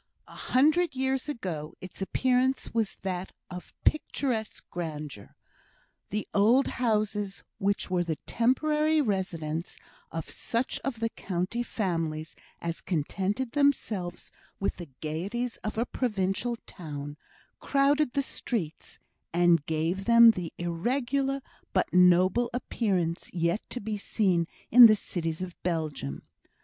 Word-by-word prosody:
A -, -, -14 dB
hundred 310 Hz, +4 st, +3 dB
years 265 Hz, +2 st, 0 dB
ago 170 Hz, -, -4 dB
its 185 Hz, +1 st, -9 dB
appearance 255 Hz, +6 st, +1 dB
was 225 Hz, -3 st, 0 dB
that 185 Hz, -1 st, -3 dB, 0.2 s
of 180 Hz, 0 st, -8 dB
picturesque 250 Hz, -7 st, 0 dB
grandeur. 150 Hz, -, -6 dB, 0.7 s
The 210 Hz, +1 st, -2 dB
old 230 Hz, +7 st, +5 dB
houses, 210 Hz, -4 st, -1 dB, 0.2 s
which 200 Hz, -2 st, 0 dB
were 180 Hz, -1 st, +2 dB
the 165 Hz, -2 st, -2 dB
temporary 300 Hz, +6 st, +2 dB
residences 175 Hz, -, -2 dB, 0.3 s
of 165 Hz, -1 st, -4 dB
such 235 Hz, +2 st, -2 dB
of 245 Hz, -5 st, -4 dB
the 230 Hz, -, +1 dB
county 185 Hz, +3 st, -2 dB
families 165 Hz, -9 st, -2 dB, 0.2 s
as 170 Hz, 0 st, -4 dB
contented 195 Hz, -, -1 dB
themselves 230 Hz, -11 st, 0 dB, 0.3 s
with 195 Hz, -, -1 dB
the 175 Hz, -4 st, -8 dB
gaieties 200 Hz, +11 st, -3 dB
of 215 Hz, 0 st, -5 dB
a 230 Hz, -, +2 dB
provincial 215 Hz, -1 st, -1 dB
town, 145 Hz, -3 st, -7 dB, 0.4 s
crowded 280 Hz, 0 st, +2 dB
the 280 Hz, -, +1 dB
streets 190 Hz, -, -4 dB, 0.3 s
and 170 Hz, -2 st, +4 dB
gave 165 Hz, +5 st, -1 dB
them 235 Hz, 0 st, +9 dB
the 180 Hz, -6 st, -5 dB
irregular 255 Hz, +10 st, 0 dB, 0.3 s
but -, -, +1 dB
noble 180 Hz, +6 st, +5 dB
appearance 185 Hz, -9 st, -1 dB
yet 170 Hz, +4 st, +1 dB
to 250 Hz, -, -4 dB
be 215 Hz, -1 st, -3 dB
seen 185 Hz, -5 st, +1 dB, 0.2 s
in 240 Hz, 0 st, +11 dB
the 215 Hz, -, +5 dB
cities 165 Hz, -4 st, -3 dB
of 180 Hz, -1 st, -6 dB
Belgium. 155 Hz, -, -3 dB
200 Hz, 125 wpm, -28 LUFS, 170-245 Hz, 0.7 s, in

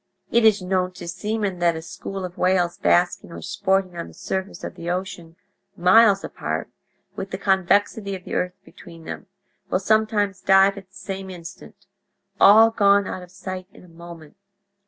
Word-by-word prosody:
"It 235 Hz, 0 st, +3 dB
is 210 Hz, -3 st, +4 dB
known 185 Hz, 0 st, -1 dB
to 180 Hz, -1 st, -9 dB
seamen 205 Hz, 0 st, -3 dB
that 170 Hz, -1 st, +2 dB
a 160 Hz, -, -5 dB
school 195 Hz, +3 st, -6 dB
of 180 Hz, 0 st, -8 dB
whales 180 Hz, -2 st, +1 dB
basking 175 Hz, -1 st, +1 dB
or -, -, -9 dB
sporting 190 Hz, -2 st, 0 dB
on 170 Hz, -, -5 dB
the 85 Hz, -, -15 dB
surface 190 Hz, +1 st, -5 dB
of -, -, -5 dB
the 170 Hz, -, -7 dB
ocean, 175 Hz, -2 st, -5 dB, 0.4 s
miles 200 Hz, +3 st, +5 dB
apart, -, -, -4 dB, 0.4 s
with 190 Hz, -, -5 dB
the 190 Hz, -, -4 dB
convexity 200 Hz, +1 st, +1 dB
of 185 Hz, -, -10 dB
the -, -, -8 dB
earth 180 Hz, 0 st, -1 dB
between 165 Hz, -2 st, -14 dB
them, -, -, -7 dB, 0.4 s
will -, -, +1 dB
sometimes 205 Hz, -1 st, +1 dB
dive 195 Hz, +1 st, +5 dB
at 195 Hz, -2 st, -12 dB
the 190 Hz, -, -25 dB
same 195 Hz, -1 st, -6 dB
instant—all 195 Hz, +3 st, +1 dB
gone 200 Hz, -2 st, +4 dB
out 185 Hz, -, -5 dB
of 180 Hz, -, -12 dB
sight 185 Hz, 0 st, -7 dB
in 230 Hz, -, -16 dB
a -, -, -16 dB
moment. 170 Hz, 0 st, -13 dB
190 Hz, 175 wpm, -23 LUFS, 180-200 Hz, 0.4 s, miles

